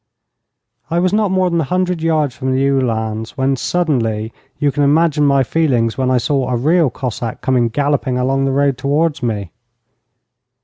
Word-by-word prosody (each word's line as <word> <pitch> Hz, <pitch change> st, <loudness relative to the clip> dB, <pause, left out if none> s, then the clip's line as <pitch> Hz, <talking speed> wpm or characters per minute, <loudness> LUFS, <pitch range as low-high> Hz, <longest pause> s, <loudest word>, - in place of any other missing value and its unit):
I 170 Hz, -, -1 dB
was 180 Hz, +2 st, +1 dB
not 210 Hz, -1 st, +2 dB
more 185 Hz, -1 st, +1 dB
than 170 Hz, -1 st, +1 dB
a -, -, -2 dB
hundred 180 Hz, +2 st, -1 dB
yards 155 Hz, -5 st, 0 dB
from 130 Hz, 0 st, -2 dB
the 135 Hz, +1 st, +2 dB
Uhlans 110 Hz, -4 st, -2 dB
when, 135 Hz, +1 st, +1 dB
suddenly, 120 Hz, -9 st, -1 dB, 0.2 s
you 145 Hz, -1 st, +1 dB
can 145 Hz, -, -2 dB
imagine 150 Hz, 0 st, +3 dB
my 140 Hz, -1 st, +3 dB
feelings 125 Hz, -6 st, 0 dB
when 130 Hz, -1 st, 0 dB
I 130 Hz, -, +3 dB
saw 130 Hz, +1 st, 0 dB
a 125 Hz, -, 0 dB
real 155 Hz, +5 st, +2 dB
Cossack 120 Hz, -2 st, -5 dB
coming 125 Hz, -3 st, +1 dB
galloping 140 Hz, 0 st, 0 dB
along 135 Hz, +2 st, 0 dB
the 135 Hz, -, 0 dB
road 140 Hz, -1 st, +1 dB
towards 145 Hz, +3 st, 0 dB
me. 105 Hz, -7 st, -3 dB
135 Hz, 175 wpm, -17 LUFS, 125-155 Hz, 0.2 s, imagine